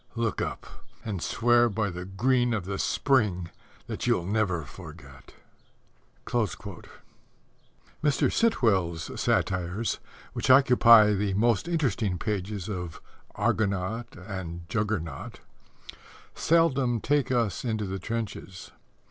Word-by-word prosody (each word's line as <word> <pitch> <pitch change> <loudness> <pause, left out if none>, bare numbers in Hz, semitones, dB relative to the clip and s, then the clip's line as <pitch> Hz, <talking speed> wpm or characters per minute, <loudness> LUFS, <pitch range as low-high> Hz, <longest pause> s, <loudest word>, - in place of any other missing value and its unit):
_ - - -11
Look 115 -3 -1
up, - - -4 0.4
and 100 -6 -3
swear 120 +3 +3
by 105 -1 -1
the 90 +1 -6
green 120 +5 +1
of 100 -5 -3
the 95 0 -4
Spring 105 -11 +1 0.3
that - - -4
you'll 85 - +2
never 95 -5 0
forget. 65 - -13 0.9
Mr. 100 -5 -3 1.4
Sitwell's 95 - +1
satires 95 +4 0 0.3
which - - -3
occupy 120 -5 +7
the 100 -1 -1
most 115 +5 +2
interesting 125 - 0
pages 100 0 -3
of 90 -6 -5 0.4
Argonaut 105 +3 -1
and 90 -3 -7
Juggernaut 100 -10 -3 0.9
seldom 140 -8 +2
take 145 +1 +1
us 115 -5 0
into 110 -4 -1
the 95 0 -4
trenches. 105 -4 -5
105 Hz, 105 wpm, -27 LUFS, 95-120 Hz, 1.4 s, occupy